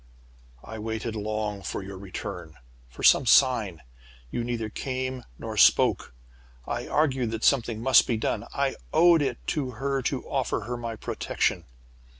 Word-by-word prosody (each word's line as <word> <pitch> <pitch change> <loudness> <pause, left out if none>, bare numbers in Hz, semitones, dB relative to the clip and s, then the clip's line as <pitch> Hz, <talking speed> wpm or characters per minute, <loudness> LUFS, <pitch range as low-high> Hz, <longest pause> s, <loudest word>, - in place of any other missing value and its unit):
"I 110 - -8
waited 110 +1 -4
long 105 -1 -3
for 95 - -5
your 95 0 -8
return, 90 -3 -7
or - - -26 0.3
for - - -11
some 135 - +6
sign. 110 - +4 0.5
"You 120 - -2
neither 115 -2 -3
came 130 +2 -4
nor - - -6
spoke. - - +4 0.5
"I - - -4
argued 135 -6 +1
that 115 0 -5
something 120 -5 +2
must 130 +2 +5
be 115 - 0
done. - - -2
I - - -1
owed 170 -1 +5
it 130 -4 -3
to 135 -5 -2
her 135 +1 -1
to 130 +1 -3
offer 135 -4 -1
her 120 +4 -4
my 115 -1 -5
protection. - - -2
115 Hz, 155 wpm, -26 LUFS, 110-130 Hz, 0.5 s, some